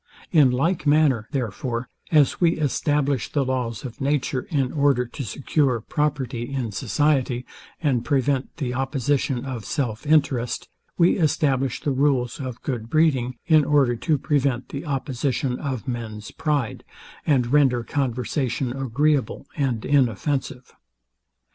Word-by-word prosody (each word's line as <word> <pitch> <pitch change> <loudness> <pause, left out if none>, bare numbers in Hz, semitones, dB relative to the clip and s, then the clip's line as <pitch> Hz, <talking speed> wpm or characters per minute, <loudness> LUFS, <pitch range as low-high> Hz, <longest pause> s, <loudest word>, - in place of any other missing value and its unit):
In 150 -6 +6
like 155 +6 0
manner, 145 -7 +3
therefore, 125 -2 -3 0.2
as 150 0 +4
we 170 -1 +5
establish 145 -3 0
the 140 -3 +1
laws 125 -1 -2
of 120 0 -8
nature, 135 -2 0
in 135 -5 0
order 140 -4 +2
to 125 +3 -7
secure 130 - 0
property 135 -2 -2
in 130 -5 -2
society, 130 +1 0 0.4
and 130 -6 +2
prevent 135 0 0
the 130 -6 -2
opposition 135 0 0
of 125 -5 -5
self 125 -2 -3
interest; 140 -6 +1 0.3
we 175 +2 +4
establish 135 -5 +1
the 145 - 0
rules 130 -3 +1
of 130 -3 -6
good 115 -5 -3
breeding, 130 -6 +2
in 155 -2 +5
order 140 -4 +3
to 150 +6 +1
prevent 135 -3 0
the 140 +4 -6
opposition 135 -1 -1
of 130 -4 -4
men's 115 -3 -5
pride, 145 -7 -1 0.4
and 130 -4 +2
render 130 -5 +4
conversation 125 -1 -1
agreeable 135 +2 0
and 130 -7 -1
inoffensive. 135 0 0
135 Hz, 130 wpm, -23 LUFS, 125-145 Hz, 0.4 s, In